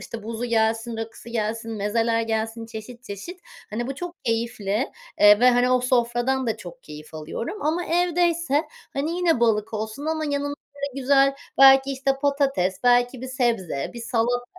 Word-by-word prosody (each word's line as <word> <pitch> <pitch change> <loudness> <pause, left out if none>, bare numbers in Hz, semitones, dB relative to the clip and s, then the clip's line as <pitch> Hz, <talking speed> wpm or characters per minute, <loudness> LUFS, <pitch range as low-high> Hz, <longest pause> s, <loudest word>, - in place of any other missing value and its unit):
işte, 225 -2 -8
buzu 230 +2 -4
gelsin, 225 0 0
rakısı 225 +1 -7
gelsin, 225 0 -3
mezeler 225 +2 0
gelsin 225 0 -2
çeşit 235 +2 -9
çeşit. 295 - -8 0.3
Hani, 235 +3 -3
bu 270 - -4
çok 350 +3 -8
keyifli, 225 0 -1 0.3
eee, 205 +1 +8
ve, 250 - +7
hani, 245 +1 +3
o 255 -1 +4
sofradan 250 +1 +1
da 220 - 0
çok 175 - -11
keyif 150 +1 -11
alıyorum 165 - -5
ama 330 +3 0
evdeyse, 340 -3 +1 0.3
hani, 285 +4 -1
yine 335 -8 +2
balık 220 -1 +1
olsun 220 +7 -4
ama 315 -1 -1
yanına 285 0 -2 0.2
böyle 280 -1 -5
güzel, 275 +1 +4 0.2
belki, 270 0 +7
işte, 270 0 0
patates, 275 -10 +1
belki 245 +1 +3
bir 260 - -5
sebze, 230 - -1
bir 235 - -7
salata, 240 +1 0
240 Hz, 165 wpm, -24 LUFS, 225-275 Hz, 0.3 s, eee